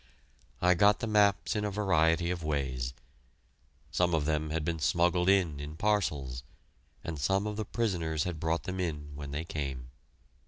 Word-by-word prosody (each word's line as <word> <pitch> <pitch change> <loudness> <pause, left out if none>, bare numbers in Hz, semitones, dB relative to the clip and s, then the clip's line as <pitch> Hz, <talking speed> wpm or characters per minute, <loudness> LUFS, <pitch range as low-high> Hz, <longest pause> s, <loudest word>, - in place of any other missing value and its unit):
I 90 0 +6
got 100 +3 +5
the - - -2
maps 105 -2 +3
in 105 - 0
a 105 - 0
variety 85 -4 +2
of 85 -2 -4
ways. 65 -5 -2 1.0
Some 85 +1 +2
of 75 -2 0
them 75 0 0
had 80 0 -2
been 85 -1 -1
smuggled 90 +3 +2
in 90 -7 +3
in 75 +2 -6
parcels, 75 -11 0 0.6
and 80 -3 -5
some 95 +10 +1
of 105 0 -3
the 110 0 -3
prisoners 85 -10 -1
had 85 -3 -4
brought 80 +1 0
them 95 0 -4
in 75 -5 -3
when 70 0 -7
they 75 +3 -3
came. 70 -6 -5
80 Hz, 170 wpm, -30 LUFS, 75-95 Hz, 1.0 s, I